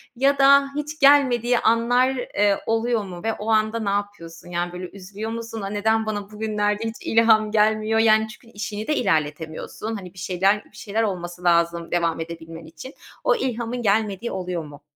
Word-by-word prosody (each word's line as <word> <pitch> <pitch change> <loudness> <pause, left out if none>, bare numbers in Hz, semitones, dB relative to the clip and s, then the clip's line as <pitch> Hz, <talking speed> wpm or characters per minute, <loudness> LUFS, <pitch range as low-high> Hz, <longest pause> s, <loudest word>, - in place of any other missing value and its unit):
ya 275 +3 +2
da 275 0 +6
hiç 300 +1 -4
gelmediği 250 -4 +4
anlar, 235 +3 +3
eee, 205 -5 +1
oluyor 225 0 0
mu 180 -2 -9
ve 225 - 0
o 215 +1 -6
anda 215 +1 +2
ne 210 -3 -2
yapıyorsun? 200 -5 -5
Yani, 175 0 -3
böyle 180 0 -6
üzülüyor 200 +3 -7
musun? 230 -1 -6
"A, 195 - -4
neden 220 +2 +1
bana 205 -1 -4
bugünlerde 210 0 -1
hiç 225 0 -3
ilham 220 -1 +3
gelmiyor?" 215 +1 +2
Yani, 220 -1 +4
çünkü 230 +2 -14
işini 210 +1 -5
de 305 - +1
ilerletemiyorsun. 160 - -2
Hani, 185 -4 -9
bir 185 - -12
şeyler 195 +3 +1
bir - - -19
şeyler 220 +2 -2
olması 175 -3 -4
lazım 170 -1 +2
devam 170 -2 0
edebilmen 165 0 -8
için. 165 - -11 0.3
O - - +3
ilhamın 245 - -3
gelmediği 215 +1 0
oluyor 180 -3 -3
mu? 145 -1 -13
215 Hz, 175 wpm, -23 LUFS, 180-225 Hz, 0.3 s, da